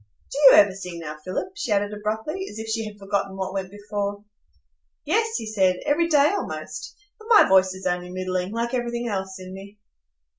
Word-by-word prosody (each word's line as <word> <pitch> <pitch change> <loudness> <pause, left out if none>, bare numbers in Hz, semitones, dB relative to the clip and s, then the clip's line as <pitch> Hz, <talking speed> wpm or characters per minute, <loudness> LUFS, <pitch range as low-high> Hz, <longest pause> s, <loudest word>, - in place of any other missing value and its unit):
Do - - -5
you - - +11
ever 200 -1 +5
sing 180 -3 -7
now, 155 -1 -6
Philip?" 185 - -3
she 395 - -4
added 205 0 +1
abruptly, 220 - -3
as 210 - -10
if 220 0 -6
she 220 0 -2
had 210 -1 -10
forgotten 195 -1 -2
what 190 0 -3
went 190 -1 -3
before. 205 0 -4 0.8
"Yes," 445 +8 +1
he 225 - -5
said, 190 -4 +2
"every 335 +4 +2
day, 295 -2 +5
almost. 405 - -5 0.2
But 435 - -13
my 445 - +7
voice 190 0 +4
is 190 - -10
only 180 0 -1
middling, 185 0 -2
like 235 +2 -2
everything 240 -1 -2
else 190 -3 -3
in 185 0 -9
me." 200 +2 -11
205 Hz, 195 wpm, -24 LUFS, 190-235 Hz, 0.8 s, you